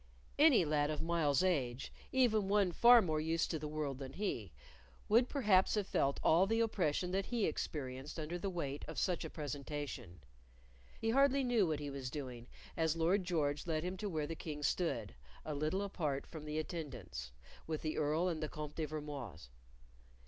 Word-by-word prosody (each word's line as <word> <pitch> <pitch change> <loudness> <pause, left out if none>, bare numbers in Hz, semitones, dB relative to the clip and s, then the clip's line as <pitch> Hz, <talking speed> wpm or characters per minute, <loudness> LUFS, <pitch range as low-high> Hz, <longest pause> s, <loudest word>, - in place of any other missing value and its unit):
Any 285 - +7
lad 150 -1 +1
of 155 0 -2
Myles's 165 -3 +2
age, 135 -9 0 0.2
even 225 -6 +3
one 200 -2 +3
far 235 +5 +7
more 155 -3 0
used 165 +1 0
to 160 - -2
the 150 - -4
world 150 -3 -3
than 135 -1 -7
he, 155 - -3 0.6
would 235 +4 +4
perhaps 210 -10 +3
have 210 -2 0
felt 140 -6 +1
all 175 +4 +5
the 225 +2 +1
oppression 180 -6 +1
that 195 +1 0
he 235 -4 +1
experienced 140 -1 -4
under 160 +3 -3
the 195 - -2
weight 145 -6 -4
of 160 - -7
such 180 -3 0
a - - -5
presentation. 140 - -5 0.8
He 225 - 0
hardly 275 +2 +4
knew 235 -7 +3
what 155 -2 -1
he 145 -1 -4
was 135 -2 -4
doing 125 -4 -6 0.3
as 160 -1 +1
Lord 180 +4 +2
George 150 -4 0
led 155 -1 0
him 180 +1 -2
to 205 +2 -3
where 155 -4 -1
the 165 - -4
King 150 -2 -6
stood, 135 - 0 0.3
a 155 - -3
little 155 +7 0
apart 155 -8 -2
from 155 -2 -9
the 150 0 -3
attendants, 145 - -5 0.4
with 155 -1 -3
the 155 -1 -1
Earl 155 +4 +1
and 165 -3 -2
the 155 - -2
Comte 150 -1 -6
de 160 - 0
Vermoise. 140 - -6
155 Hz, 185 wpm, -36 LUFS, 145-185 Hz, 0.8 s, Any